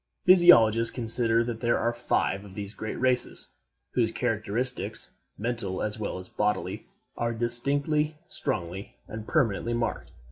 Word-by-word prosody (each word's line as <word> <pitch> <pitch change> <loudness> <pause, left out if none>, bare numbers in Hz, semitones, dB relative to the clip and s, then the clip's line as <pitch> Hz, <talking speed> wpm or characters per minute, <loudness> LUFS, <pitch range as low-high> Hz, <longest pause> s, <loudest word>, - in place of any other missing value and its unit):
Physiologists 115 - +6
consider 115 -1 +2
that 115 -1 -4
there 120 -1 +1
are 120 - 0
five 110 -4 -1
of 95 -2 -13
these 100 0 -5
great 110 -1 -6
races, 125 0 +1 0.4
whose 115 -3 +1
characteristics, 115 -1 -2 0.3
mental 115 -4 -2
as 105 +1 -3
well 105 - -3
as 90 0 -8
bodily, 105 -1 -2 0.3
are 115 0 -1
distinctly, 140 +6 0
strongly, 100 - -4
and 110 0 -8
permanently 120 - +1
marked. 120 0 -3
115 Hz, 135 wpm, -27 LUFS, 105-125 Hz, 0.4 s, Physiologists